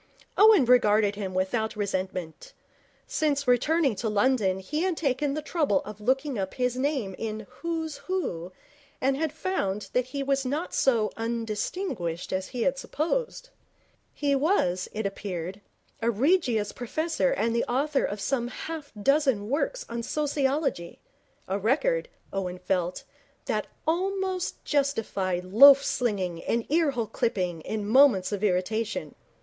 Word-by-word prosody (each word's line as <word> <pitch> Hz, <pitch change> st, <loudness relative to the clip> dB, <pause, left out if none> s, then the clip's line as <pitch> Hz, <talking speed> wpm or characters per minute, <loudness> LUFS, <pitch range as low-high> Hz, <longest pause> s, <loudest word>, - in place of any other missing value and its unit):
Owen 415 Hz, -, +7 dB
regarded 215 Hz, -4 st, +4 dB
him 195 Hz, -2 st, -5 dB
without 220 Hz, +5 st, 0 dB
resentment. 190 Hz, -, -4 dB, 0.5 s
Since 285 Hz, -3 st, 0 dB
returning 275 Hz, +3 st, +3 dB
to 220 Hz, +2 st, -1 dB
London 210 Hz, -3 st, +2 dB
he 295 Hz, +12 st, -3 dB
had 365 Hz, -2 st, 0 dB
taken 280 Hz, -1 st, 0 dB
the 305 Hz, -, -3 dB
trouble 300 Hz, -3 st, +1 dB
of 210 Hz, 0 st, -9 dB
looking 265 Hz, +2 st, 0 dB
up 190 Hz, -1 st, -3 dB
his 250 Hz, -1 st, 0 dB
name 260 Hz, -7 st, -1 dB
in 220 Hz, -1 st, -4 dB, 0.2 s
Who's 325 Hz, -2 st, -3 dB
Who 185 Hz, -, -2 dB, 0.5 s
and 270 Hz, +1 st, +2 dB
had 310 Hz, +1 st, -1 dB
found 210 Hz, -, -2 dB
that 250 Hz, 0 st, +2 dB
he 275 Hz, +2 st, -4 dB
was 275 Hz, 0 st, +1 dB
not 290 Hz, +7 st, -3 dB
so 230 Hz, -5 st, +2 dB
undistinguished 225 Hz, -, -3 dB
as 190 Hz, 0 st, -1 dB
he 245 Hz, -3 st, -3 dB
had 275 Hz, 0 st, +1 dB
supposed. 485 Hz, -, -2 dB, 0.6 s
He 285 Hz, -1 st, 0 dB
was, 270 Hz, -, +1 dB
it 215 Hz, 0 st, -4 dB
appeared, 195 Hz, -1 st, -4 dB, 0.4 s
a 230 Hz, -, +2 dB
Regius 240 Hz, -, +2 dB
Professor 315 Hz, -, -1 dB
and 235 Hz, -, 0 dB
the 235 Hz, -, +1 dB
author 275 Hz, +3 st, 0 dB
of 205 Hz, -, -2 dB
some 240 Hz, +4 st, -1 dB
half 305 Hz, +3 st, -6 dB
dozen 265 Hz, -4 st, +2 dB
works -, -, -1 dB
on 235 Hz, -, -4 dB
sociology 280 Hz, -, -1 dB, 0.5 s
a 195 Hz, +2 st, -1 dB
record, 480 Hz, -, +1 dB, 0.2 s
Owen 185 Hz, -2 st, -3 dB
felt, 180 Hz, -1 st, -2 dB, 0.4 s
that -, -, -1 dB, 0.2 s
almost 375 Hz, +2 st, -1 dB
justified 210 Hz, -11 st, 0 dB
loaf 275 Hz, +8 st, +8 dB
slinging 190 Hz, -9 st, -1 dB
and 235 Hz, 0 st, 0 dB
ear 320 Hz, -1 st, +3 dB
hole 245 Hz, -4 st, -1 dB
clipping 185 Hz, -7 st, -1 dB
in 210 Hz, +4 st, -4 dB
moments 230 Hz, -6 st, +5 dB
of 205 Hz, 0 st, -3 dB
irritation. 210 Hz, +3 st, -1 dB
245 Hz, 140 wpm, -27 LUFS, 205-295 Hz, 0.6 s, loaf